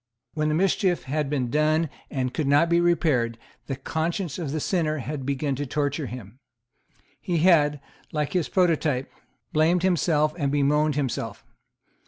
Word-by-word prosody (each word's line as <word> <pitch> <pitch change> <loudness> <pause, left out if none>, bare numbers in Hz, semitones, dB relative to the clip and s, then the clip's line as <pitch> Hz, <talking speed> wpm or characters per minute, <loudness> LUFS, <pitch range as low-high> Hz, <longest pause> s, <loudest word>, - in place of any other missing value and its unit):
When 155 -1 0
the 150 - +1
mischief 185 0 +1
had 145 +1 -2
been 130 -5 -1
done 155 +2 +2 0.2
and 130 -2 -2
could 150 - -1
not 145 +4 +4
be 170 0 +3
repaired, 150 -10 +1 0.3
the 135 - -2
conscience 160 +3 -3
of 155 -5 -3
the 155 - -2
sinner 155 -2 0
had 135 0 -5
begun 140 0 -1
to 145 0 -3
torture 145 +1 -1
him. 120 0 -9 0.8
He 175 -2 -1
had, 155 -4 +4 0.3
like 150 -2 -2
his 180 -4 0
prototype, 160 -7 +1 0.4
blamed 165 +3 +3
himself 155 -4 +2
and 140 -2 0
bemoaned 145 +1 +2
himself. 135 -5 -3
150 Hz, 155 wpm, -25 LUFS, 140-165 Hz, 0.8 s, not